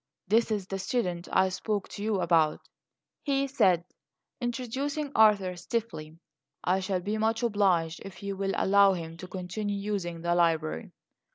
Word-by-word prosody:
"This 225 Hz, +5 st, +3 dB
is 210 Hz, -3 st, -1 dB
the 195 Hz, +1 st, -4 dB
student 185 Hz, -5 st, -2 dB
I 190 Hz, 0 st, +4 dB
spoke 205 Hz, +2 st, -2 dB
to 205 Hz, -, -7 dB
you 210 Hz, -3 st, 0 dB
about," 160 Hz, -4 st, +3 dB, 0.6 s
he 275 Hz, -1 st, +1 dB
said, 185 Hz, -11 st, +2 dB, 0.5 s
introducing 265 Hz, +4 st, -3 dB
Arthur 205 Hz, -4 st, +4 dB
stiffly. 175 Hz, -6 st, -4 dB, 0.5 s
"I 185 Hz, +2 st, +2 dB
shall 190 Hz, -1 st, -1 dB
be 210 Hz, +4 st, -2 dB
much 225 Hz, +2 st, +1 dB
obliged 190 Hz, -7 st, +1 dB
if 195 Hz, 0 st, -10 dB
you 200 Hz, 0 st, -3 dB
will 195 Hz, 0 st, -1 dB
allow 200 Hz, 0 st, +5 dB
him 165 Hz, -2 st, -6 dB
to 185 Hz, -, -8 dB
continue 195 Hz, +3 st, -4 dB
using 195 Hz, -5 st, -3 dB
the 170 Hz, +1 st, +1 dB
library." 160 Hz, -, +1 dB
195 Hz, 155 wpm, -28 LUFS, 175-220 Hz, 0.6 s, allow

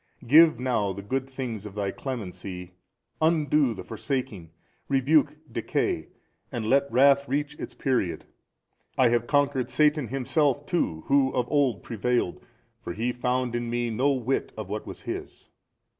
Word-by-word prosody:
Give 155 Hz, +1 st, +7 dB
now 120 Hz, -6 st, 0 dB
the 100 Hz, +1 st, -8 dB
good 135 Hz, +5 st, -2 dB
things 120 Hz, -6 st, -5 dB
of 100 Hz, -, -11 dB
Thy 100 Hz, -2 st, -1 dB
Clemency, 95 Hz, -8 st, -6 dB, 0.5 s
undo 150 Hz, -6 st, +3 dB
the -, -, -7 dB
forsaking, 115 Hz, -, -4 dB, 0.4 s
rebuke 140 Hz, +2 st, +3 dB
decay -, -, -1 dB, 0.4 s
and 115 Hz, -2 st, -3 dB
let 140 Hz, +4 st, +2 dB
wrath 140 Hz, +3 st, +5 dB
reach 145 Hz, +2 st, -1 dB
its -, -, -7 dB
period. 100 Hz, -, -1 dB, 0.7 s
I 130 Hz, -2 st, +5 dB
have 120 Hz, 0 st, +1 dB
conquered 140 Hz, -3 st, +1 dB
Satan 150 Hz, -3 st, +2 dB
himself 140 Hz, +2 st, 0 dB
too 80 Hz, -, -1 dB
who 135 Hz, -1 st, +3 dB
of 125 Hz, -1 st, 0 dB
old 135 Hz, -, +2 dB
prevailed, 120 Hz, -4 st, -1 dB, 0.4 s
for -, -, -4 dB
he 115 Hz, +6 st, -1 dB
found 125 Hz, 0 st, -1 dB
in 120 Hz, 0 st, -2 dB
Me 120 Hz, 0 st, -1 dB
no 130 Hz, +6 st, +2 dB
whit 130 Hz, 0 st, -1 dB
of 110 Hz, -3 st, -5 dB
what 105 Hz, +2 st, -5 dB
was -, -, -8 dB
his. -, -, -7 dB
125 Hz, 150 wpm, -26 LUFS, 110-140 Hz, 0.7 s, Give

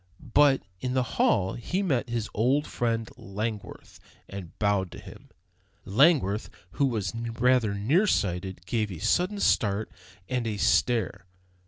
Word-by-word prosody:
But 145 Hz, -2 st, +5 dB, 0.2 s
in 125 Hz, +4 st, -3 dB
the 130 Hz, -, +2 dB, 0.2 s
hall 95 Hz, -1 st, +2 dB
he 180 Hz, -, -2 dB
met 135 Hz, -10 st, 0 dB
his 115 Hz, -2 st, -2 dB
old 130 Hz, +7 st, +2 dB
friend 115 Hz, -1 st, -1 dB
Langworth 105 Hz, +2 st, -6 dB, 0.3 s
and 95 Hz, -4 st, -9 dB
bowed 100 Hz, -3 st, +1 dB
to -, -, -9 dB
him. -, -, -13 dB, 0.6 s
Langworth, 110 Hz, -, +3 dB, 0.2 s
who 140 Hz, -, +1 dB
was 110 Hz, -6 st, -2 dB
rather 115 Hz, -1 st, +1 dB
near 145 Hz, -, +2 dB
sighted, 90 Hz, -, -1 dB
gave 105 Hz, 0 st, -1 dB
a 90 Hz, -, -6 dB
sudden 185 Hz, -, +1 dB
start 105 Hz, -, +1 dB, 0.4 s
and 125 Hz, -1 st, -1 dB
a 105 Hz, -2 st, -2 dB
stare. 115 Hz, -2 st, +1 dB
115 Hz, 140 wpm, -27 LUFS, 100-130 Hz, 0.6 s, But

